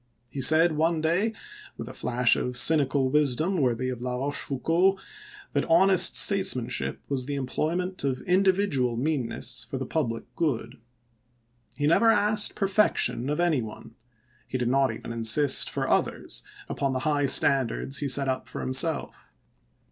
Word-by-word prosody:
He 135 Hz, -, -5 dB
said 160 Hz, +5 st, +6 dB
one 160 Hz, +2 st, 0 dB
day, 170 Hz, +8 st, 0 dB, 0.5 s
with -, -, -8 dB
a -, -, -9 dB
flash 125 Hz, 0 st, 0 dB
of 125 Hz, 0 st, -3 dB
cynical 140 Hz, -3 st, +2 dB
wisdom 150 Hz, +5 st, +1 dB
worthy 130 Hz, 0 st, -1 dB
of 125 Hz, -2 st, -6 dB
La 125 Hz, 0 st, -4 dB
Bochefou 140 Hz, +1 st, -2 dB
cauld, 185 Hz, +6 st, +1 dB, 0.5 s
that -, -, 0 dB
honest 185 Hz, +2 st, +3 dB
statesmanship 130 Hz, -, +1 dB
was 135 Hz, -2 st, -2 dB
the 145 Hz, -, -3 dB
employ 140 Hz, +4 st, -3 dB
ment 180 Hz, -1 st, -4 dB
of 135 Hz, -2 st, -2 dB
individual 180 Hz, -, 0 dB
meannesses 130 Hz, -4 st, -3 dB
for 120 Hz, +4 st, -7 dB
the 130 Hz, -, -5 dB
public 120 Hz, -6 st, -3 dB
good. 125 Hz, -6 st, -3 dB, 1.0 s
He 145 Hz, -, -2 dB
never 170 Hz, +9 st, +3 dB
asked 210 Hz, -1 st, +2 dB
perfection 195 Hz, -, 0 dB
of 150 Hz, +2 st, -2 dB
any 170 Hz, -6 st, +1 dB
one; 110 Hz, +1 st, -10 dB, 0.5 s
he 130 Hz, -, -4 dB
did 120 Hz, -1 st, -2 dB
not 135 Hz, 0 st, +1 dB
even 115 Hz, -, -9 dB
insist, 115 Hz, +5 st, +3 dB
for -, -, -4 dB
others, -, -, -1 dB, 0.3 s
upon 135 Hz, -1 st, -3 dB
the 130 Hz, -, -2 dB
high 145 Hz, -2 st, 0 dB
standards 135 Hz, 0 st, +1 dB
he 145 Hz, -, -3 dB
set 135 Hz, +1 st, +2 dB
up 130 Hz, 0 st, -3 dB
for -, -, -6 dB
himself. 140 Hz, +5 st, -2 dB
140 Hz, 155 wpm, -25 LUFS, 125-170 Hz, 1.0 s, said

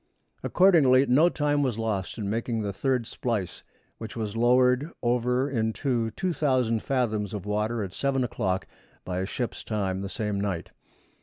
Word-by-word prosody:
Accordingly 145 Hz, -9 st, +5 dB
no 145 Hz, +7 st, +5 dB
time 145 Hz, -3 st, +1 dB
was 130 Hz, -6 st, 0 dB
lost 110 Hz, -4 st, -2 dB
in 105 Hz, -3 st, -3 dB
making 115 Hz, +1 st, -1 dB
the 100 Hz, -1 st, -3 dB
third 130 Hz, +2 st, 0 dB
splice, 115 Hz, -6 st, -3 dB, 0.4 s
which 110 Hz, -2 st, -7 dB
was 110 Hz, -2 st, -3 dB
lowered 125 Hz, +4 st, +3 dB
over 125 Hz, +2 st, +1 dB
into 115 Hz, -1 st, 0 dB
2,000 130 Hz, -, 0 dB
fathoms 110 Hz, -6 st, -1 dB
of 100 Hz, -, -6 dB
water 105 Hz, +2 st, -1 dB
at 95 Hz, -2 st, -6 dB
seven 135 Hz, +1 st, 0 dB
o'clock 95 Hz, -6 st, -1 dB, 0.4 s
by 90 Hz, 0 st, -2 dB
ship's 120 Hz, +4 st, -4 dB
time 95 Hz, -3 st, -2 dB
the 100 Hz, -, -4 dB
same 105 Hz, -1 st, -2 dB
night. 95 Hz, -5 st, -3 dB
115 Hz, 150 wpm, -27 LUFS, 105-130 Hz, 0.4 s, Accordingly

